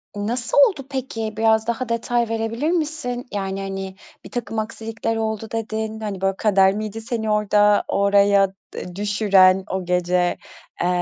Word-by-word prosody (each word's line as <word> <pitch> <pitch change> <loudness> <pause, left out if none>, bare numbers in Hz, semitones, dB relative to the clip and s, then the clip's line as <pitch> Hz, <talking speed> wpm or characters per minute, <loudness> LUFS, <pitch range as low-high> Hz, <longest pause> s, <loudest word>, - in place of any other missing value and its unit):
Nasıl 235 +6 -2
oldu 275 -9 -8
peki? 225 -5 -4
Biraz 220 0 +3
daha 235 +1 -2
detay 235 0 0
verebilir 230 +7 -1
misin? 300 -7 -2
Yani, 195 -1 -3
hani, 195 -1 -5 0.3
birtakım 225 -3 -4
aksilikler 225 0 -3
oldu 220 0 -2
dedin. 220 -1 -3
Hani, 205 -3 -5
böyle, 195 0 +1
kader 195 -2 +4
miydi 215 +1 -5
seni 220 -1 -3
orada 210 0 +3
oraya 200 0 +4 0.3
e 180 0 -7
düşüren 195 -2 +4
o 190 -1 -2
gece, 180 0 +1 0.4
eee, 175 - +1
215 Hz, 140 wpm, -22 LUFS, 195-225 Hz, 0.4 s, kader